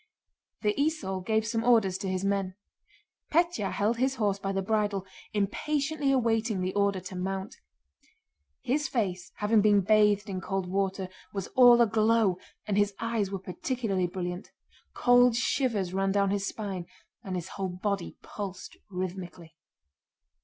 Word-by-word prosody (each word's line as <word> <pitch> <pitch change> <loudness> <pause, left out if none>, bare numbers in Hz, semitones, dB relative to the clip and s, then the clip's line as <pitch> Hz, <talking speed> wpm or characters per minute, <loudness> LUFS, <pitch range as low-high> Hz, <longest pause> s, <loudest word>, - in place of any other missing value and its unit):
The 210 0 +2
esaul 280 - -1
gave 220 +2 +1
some 225 +1 -1
orders 220 -6 +3
to 195 -1 -3
his 185 +1 -1
men. 195 -2 0 0.8
Pétya 335 - +1
held 215 +3 0
his 265 +2 +1
horse 205 -4 0
by 195 0 -2
the 195 0 -1
bridle, 205 -2 0 0.3
impatiently 280 +8 0
awaiting 225 -5 +1
the 185 +1 -1
order 200 -1 +1
to 185 +1 -8
mount. 190 +2 -4 1.1
His 295 +4 0
face, 190 -5 -2
having 210 +1 +3
been 205 -1 +5
bathed 210 +1 +3
in 190 -2 -4
cold 195 -1 -2
water, 190 0 -1 0.3
was 195 -2 -3
all 245 -2 +7
aglow, 220 -3 +3 0.3
and 205 -1 +1
his 205 -1 +1
eyes 230 -4 -1
were 195 - -3
particularly 190 0 -2
brilliant. 180 0 -5 0.5
Cold 245 -1 +5
shivers 230 -7 0
ran 195 0 +1
down 200 0 +2
his 200 -1 -1
spine 190 -5 -5 0.4
and 190 -4 -4
his 175 -2 -4
whole 190 -1 -3
body 185 +1 -3
pulsed 195 -3 -7
rhythmically. 180 -3 -6
200 Hz, 145 wpm, -28 LUFS, 190-225 Hz, 1.1 s, all